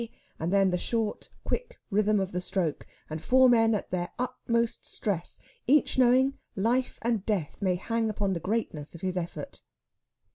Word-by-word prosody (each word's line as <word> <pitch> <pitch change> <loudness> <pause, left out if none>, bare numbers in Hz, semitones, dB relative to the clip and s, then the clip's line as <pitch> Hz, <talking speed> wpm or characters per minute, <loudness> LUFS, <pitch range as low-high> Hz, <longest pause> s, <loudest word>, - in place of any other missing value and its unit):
and 165 +3 -1
then 195 -1 +4
the 180 - 0
short, 225 0 -2
quick - - -3
rhythm 210 +1 +3
of 190 0 -2
the 180 - -2
stroke, 175 -5 -2 0.2
and 155 0 -5
four 260 +5 +5
men 225 -2 +5
at 205 - -4
their 175 -1 -1
utmost 235 -2 -1
stress, 185 -5 -3 0.3
each 290 +3 +4
knowing 260 +2 +4 0.2
life 240 +6 +1
and 230 -4 +1
death 200 -5 -2
may 185 -2 +2
hang 225 +4 -1
upon 200 -2 -1
the 170 - -2
greatness 170 -6 -3
of 170 - -10
his 185 -1 -2
effort. 175 -1 -5
210 Hz, 170 wpm, -28 LUFS, 180-235 Hz, 0.3 s, four